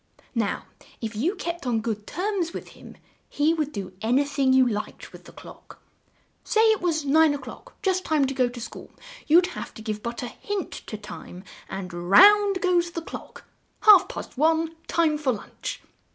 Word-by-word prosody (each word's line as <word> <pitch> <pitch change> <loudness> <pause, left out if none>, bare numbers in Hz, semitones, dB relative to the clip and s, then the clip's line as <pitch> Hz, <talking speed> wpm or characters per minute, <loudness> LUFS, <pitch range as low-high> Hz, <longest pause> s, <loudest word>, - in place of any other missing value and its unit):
Now 225 -5 -1 0.3
if 220 -1 -5
you 320 - 0
kept 345 -6 -5
on 235 -2 +1
good 220 -2 -4
terms 365 -3 -2
with - - -7
him, - - -14 0.3
he 300 +3 +2
would 305 -3 -2
do 195 -5 -6
an 225 +3 +1
y 285 - +4
thing 280 -2 +1
you 260 -1 +5
liked 210 -3 -5
with - - -13
the - - -13
clock. - - -14 0.6
Say 440 - +2
it 435 - 0
was 320 -4 0
nine 305 +1 +4
o'clock, - - -10
just 375 -1 +1
time 305 -5 +2
to 270 - -2
go 255 -2 +1
to 240 0 -9
school; 235 - -9 0.4
you'd 345 +4 +6
have - - -5
but - - -21
to - - -9
give 215 -1 -4
a 235 +1 -4
hint 390 +9 -5 0.2
to 215 - -5
Time, 195 -3 -10 0.3
and 190 -2 -6
round 390 - +6
goes 350 -2 +2
the 335 -1 -6
clock! - - -9 0.4
Half 420 -4 +7
past 265 - -8
one, 325 +1 +2
time 315 -3 +1
for 270 -4 +1
lunch." 210 - -7
295 Hz, 190 wpm, -25 LUFS, 235-345 Hz, 0.6 s, Half